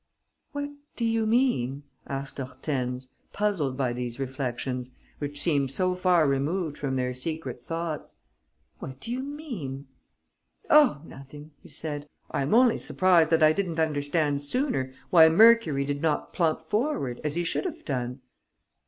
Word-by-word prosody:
"What 285 -1 -4 0.2
do 235 - -1
you 225 -1 +1
mean?" 180 - +1 0.2
asked 135 0 -5
Hortense, 130 -1 -4 0.2
puzzled 180 -11 0
by 130 -3 0
these 120 0 -5
reflections, 130 -1 -3 0.3
which 145 0 -3
seemed 145 -4 +2
so 185 +7 +1
far 180 -4 +3
removed 150 +4 0
from 135 -2 -3
their 125 -1 -1
secret 130 -2 -4
thoughts. 165 +3 -5 0.6
"What 130 0 -8
do 230 - -6
you 250 - -2
mean?" 240 - -6 0.9
"Oh, 275 - +6
nothing!" 145 +2 -12
he - - -15
said. 150 -2 -5 0.2
"I - - -1
am 140 +10 +1
only 245 -1 +5
surprised 175 -4 +3
that 165 -1 +3
I 155 0 +6
didn't 170 -3 -2
understand 145 -1 0
sooner 145 - -1 0.2
why 160 -2 +8
Mercury 210 -7 +5
did 145 0 -3
not 155 -2 -1
plump 160 -2 0
forward, 210 - -1
as 150 0 -1
he 175 - 0
should 170 - -1
have 335 -3 -5
done." 125 -2 -3
150 Hz, 150 wpm, -27 LUFS, 135-185 Hz, 0.9 s, why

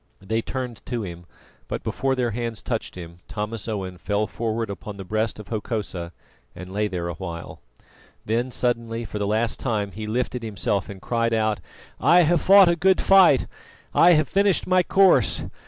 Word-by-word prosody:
They 110 +4 -2
turned 125 -1 -5
to 120 -3 -2
him, 85 -2 -8 0.4
but - - -4
before 135 0 -1
their 125 -2 0
hands 115 -1 -4
touched - - -3
him 85 -1 -10
Thomas 105 +1 -5
Owen 95 -5 -4
fell 105 +3 0
forward 115 -1 -3
upon 100 +2 -8
the 95 - -6
breast 110 +3 -1
of 105 - -10
Hokosa 105 -6 -4 0.4
and 90 +2 -9
lay 105 +1 0
there 90 -3 -4
a 85 - -3
while. 85 -1 -7 0.7
Then 120 +4 0
suddenly, 115 -2 -2
for 105 - -5
the 100 - -1
last 110 +2 0
time, 105 -5 -1
he 105 +3 -6
lifted 125 +2 -2
himself 100 -3 -2
and 100 -1 -8
cried 115 -1 0
aloud: 110 -1 0 0.4
"I 175 +1 +5
have 170 +1 +2
fought 195 -1 +7
a 170 - +3
good 185 +3 +3
fight! 190 -9 +6 0.5
I 175 +1 +6
have 155 -3 +3
finished 200 -1 +2
my 185 0 +4
course! 155 - +3
110 Hz, 180 wpm, -24 LUFS, 100-125 Hz, 0.7 s, fought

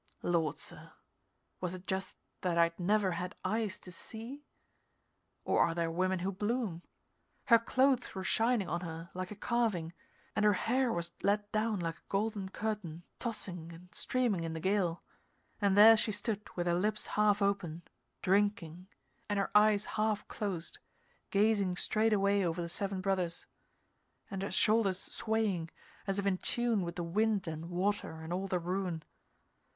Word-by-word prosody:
Lord, 165 -4 +1
sir - - -5 0.7
was 180 0 -2
it 185 0 -11
just 190 0 -2 0.3
that 175 -2 0
I'd 170 +1 +3
never 195 +1 +2
had 180 +3 -4
eyes 215 +1 0
to 180 - -11
see? 235 +10 -4 1.0
Or - - +2
are 165 - +3
there 165 -1 0
women 185 +2 +1
who 185 +2 -1
bloom? 205 -3 -2 0.6
Her 230 -2 +7
clothes 260 +1 +2
were 190 - -3
shining 225 0 +2
on 170 +2 -2
her, 165 -1 -7
like 185 0 -4
a 210 - -7
carving, 210 -7 0 0.4
and 210 - +1
her 210 -1 +6
hair 245 +6 +1
was 170 -3 -3
let 205 +1 +1
down 215 -1 0
like 165 -1 -3
a - - -26
golden 200 -1 -1
curtain 195 -6 -4 0.2
tossing 180 -8 -4
and 175 +2 -14
streaming 235 -9 0
in 165 -1 -3
the 160 - -4
gale, 185 -1 0 0.6
and 200 -1 +3
there 220 +2 +10
she 215 0 +2
stood 210 0 -3
with 175 - -1
her 175 - +2
lips 210 +4 0
half 210 -1 +3
open, 195 -5 0 0.4
drinking, 190 -3 +1 0.4
and 205 - 0
her 195 - 0
eyes 210 0 +5
half 215 -1 -1
closed, 190 -5 -3 0.5
gazing 200 -3 +2
straight 215 +4 +2
away 200 -1 +3
over 170 -1 -1
the 170 -1 -3
Seven 195 +1 -2
Brothers, 185 -3 -1 0.9
and 195 -1 -3
her 195 - -2
shoulders 215 -4 +3
swaying, 210 -6 -1 0.4
as 195 0 0
if 200 - -1
in 190 -2 +1
tune 240 -4 +1
with 170 -1 -4
the 175 - -2
wind 205 +2 +1
and 160 +1 -5
water 180 -2 -1
and 160 +2 -5
all 190 +2 -2
the 185 - 0
ruin. 180 -2 -2
195 Hz, 165 wpm, -33 LUFS, 175-215 Hz, 1.0 s, there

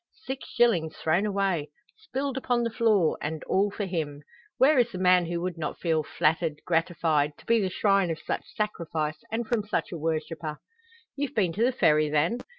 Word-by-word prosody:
Six 265 +1 -5
shillings 180 -10 +2
thrown 175 +6 +1
away 195 -7 0 0.3
spilled 275 - -4
upon 245 -2 0
the 230 - -1
floor 215 -8 +2
and 155 +1 -4
all 200 +2 +2
for 205 0 -4
him! 155 -5 -4 0.3
Where 275 +1 +5
is 240 -1 +2
the 185 - -6
man 180 -1 +4
who 170 0 -2
would 175 -2 -3
not 150 - -4
feel 160 -2 +1
flattered, 155 0 0
gratified, 160 -3 +1
to - - -18
be 230 -1 +3
the 190 - 0
shrine 195 -1 +2
of 165 - -2
such 165 - -4
sacrifice, 160 -7 -2
and 230 +1 -1
from 225 -2 0
such 210 - -2
a 170 - -5
worshipper? 155 -1 -3 0.6
"You've 285 0 -3
been 185 -6 +2
to 220 - 0
the 250 - +4
Ferry, 155 -11 +3
then?" 155 +10 +1
180 Hz, 190 wpm, -27 LUFS, 160-225 Hz, 0.6 s, Where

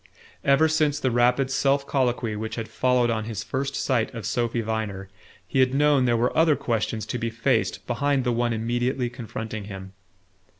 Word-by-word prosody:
Ever 140 +3 +4
since 155 -2 +1
the 130 - 0
rapid 125 +3 +2
self 140 +1 +2
colloquy 125 -5 0
which 110 +1 -4
had 115 -1 -4
followed 125 -2 +2
on 110 -1 -2
his 110 -1 -4
first 140 +1 -3
sight 125 -5 0
of 115 -4 -6
Sophy 120 +1 0
Viner, 105 -3 -3 0.4
he 135 - -1
had 130 0 +3
known 145 -2 +4
there 120 -1 +2
were 120 +2 0
other 160 -1 +4
questions 115 -3 -2
to 120 +3 -4
be 115 0 -1
faced 115 -3 0
behind 140 +2 0
the 125 - +1
one 120 0 0
immediately 120 +2 -1
confronting 110 -3 -6
him. 95 -2 -9
120 Hz, 180 wpm, -25 LUFS, 110-135 Hz, 0.4 s, Ever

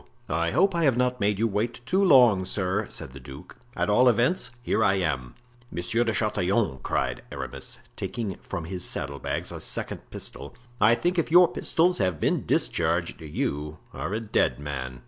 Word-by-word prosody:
"I 85 +2 +1
hope 195 - +3
I 170 -2 +1
have 130 -4 +3
not 125 0 +1
made 105 -1 +1
you 115 +2 +2
wait 115 +4 -2
too 190 +9 +2
long, 125 - +6
sir," 95 +2 -1
said 65 - -7
the 70 - -9
duke; 65 +1 -11 0.2
"at - - 0
all 125 +5 +5
events, 120 - +1
here 110 - +1
I 100 -1 +4
am." 75 -10 -2 0.3
"Monsieur 90 +8 0
de 115 - 0
Chatillon," 100 - 0
cried 65 -1 -1
Aramis, - - -6 0.2
taking 95 +1 -3
from 85 - -6
his 90 +1 -5
saddle 70 0 -3
bags - - -3
a - - -6
second - - -5
pistol, - - -7 0.2
"I 110 +2 +6
think 175 +8 0
if 165 - 0
your 175 +2 +7
pistols 175 +3 +1
have 90 -6 0
been - - 0
discharged - - 0
you 75 0 -3 0.2
are - - -4
a 110 - -1
dead 110 -2 +1
man." 65 -3 -5
105 Hz, 185 wpm, -26 LUFS, 80-120 Hz, 0.3 s, your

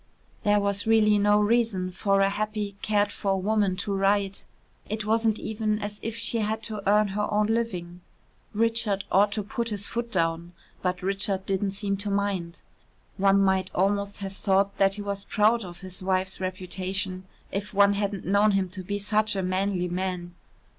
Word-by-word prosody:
There 205 0 +3
was 200 +1 -1
really 215 -2 +5
no 205 +1 +4
reason 210 -4 +1
for 195 +1 +1
a 195 - +4
happy, 210 -1 -3
cared 205 -1 +2
for 195 -1 -1
woman 205 -1 +1
to 200 +2 -3
write. 195 0 +1 0.4
It 215 0 -3
wasn't 220 0 +2
even 215 -1 -1
as 205 -1 -5
if 225 0 -4
she 230 0 -1
had 220 +1 -1
to 215 -2 -4
earn 210 0 +4
her 210 +2 -2
own 210 0 +2
living. 185 -6 -2 0.5
Richard 220 -2 +1
ought 205 +1 +4
to 210 - -1
put 235 +2 -3
his 205 -2 -3
foot 235 +2 -4
down, 170 -2 -1 0.3
but 180 0 -2
Richard 195 0 0
didn't 195 0 -1
seem 200 -1 -1
to 200 +1 -2
mind. 200 -4 -2 0.6
One 195 0 +4
might 190 -1 +2
almost 200 +2 0
have 195 -1 -5
thought 195 0 +1
that 195 0 +4
he 205 - -5
was 200 -1 -4
proud 220 +2 +2
of 175 -1 -9
his 185 -1 -8
wife's 185 0 0
reputation, 185 0 -3 0.3
if 200 0 -3
one 200 0 +5
hadn't 200 -1 -2
known 200 +2 +3
him 195 -2 +1
to 185 +1 -7
be 205 +3 -3
such 210 +1 +1
a 190 - -1
manly 185 0 0
man. 180 -1 -3
200 Hz, 180 wpm, -26 LUFS, 190-210 Hz, 0.6 s, really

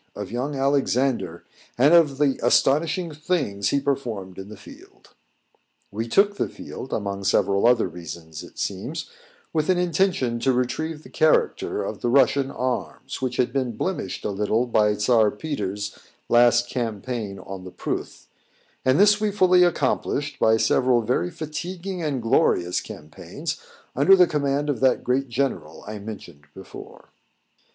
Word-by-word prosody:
of - - -6
young 130 +5 -3
Alexander, 135 -8 0 0.3
and 140 +6 +5
of 155 -5 +5
the 140 -2 +1
astonishing 155 +7 +2
things 145 - -1
he 140 - +2
performed 120 -10 -3
in 95 +1 -8
the 105 - -10
field. - - -16 0.8
We 110 +3 -3
took 200 - +3
the - - -1
field, 130 - -9
among 100 -2 -3
several 100 +2 +2
other 120 -4 +3
reasons, 80 -2 -9
it - - -14
seems, 120 - -4 0.4
with 155 0 0
an 185 - +4
intention 175 -9 +1
to 130 +3 +2
retrieve 150 +6 -2
the - - -14
character 155 -1 +1
of - - -6
the 120 - 0
Russian 135 +1 +3
arms, 130 +1 -4
which 125 -1 -2
had 125 -1 +1
been 130 -5 -2
blemished 175 - -3
a - - -1
little 105 +4 0
by 105 -3 +2
Czar 110 +1 +3
Peter's 105 -5 -4 0.3
last 120 0 +4
campaign 115 -3 -4
on 95 0 -8
the 90 - -8
Pruth; - - -5 0.6
and 130 +5 +3
this 210 +1 +5
we 215 - +2
fully 185 -3 +4
accomplished 145 -3 0
by 110 0 +4
several 120 +2 +2
very 105 -6 0
fatiguing 175 - -5
and 140 -6 -2
glorious 115 - +2
campaigns 75 0 -7 0.3
under 145 +9 +6
the 180 -1 +6
command 145 -2 -1
of 140 -6 -1
that 130 -1 +2
great 130 +2 0
general 115 - -3
I 105 0 -6
mentioned 100 -8 -10
before. 95 - -12
125 Hz, 150 wpm, -24 LUFS, 105-150 Hz, 0.8 s, under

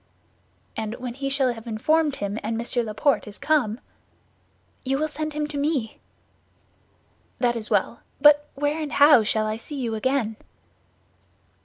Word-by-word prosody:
"And 220 +1 -4
when 250 -1 -6
he 275 +2 -3
shall 270 -2 +2
have 225 0 -11
informed 295 +7 +1
him, 205 +2 -3
and 225 +1 -3
Monsieur 240 +1 -1
Laporte 225 +4 0
is 205 - -8
come?" 255 -8 +1 1.0
"You 270 +1 0
will 310 +2 0
send 310 +1 -4
him 300 0 -1
to 290 -1 -4
me." 280 -7 -1 1.4
"That 240 -1 +1
is 225 -1 -5
well; - - 0 0.2
but 295 +1 +5
where 290 +3 -1
and 300 -2 -4
how 290 -3 +7
shall 215 0 +1
I 215 0 -2
see 280 +5 -7
you 235 -3 -2
again?" 220 -1 -1
260 Hz, 155 wpm, -24 LUFS, 220-295 Hz, 1.4 s, how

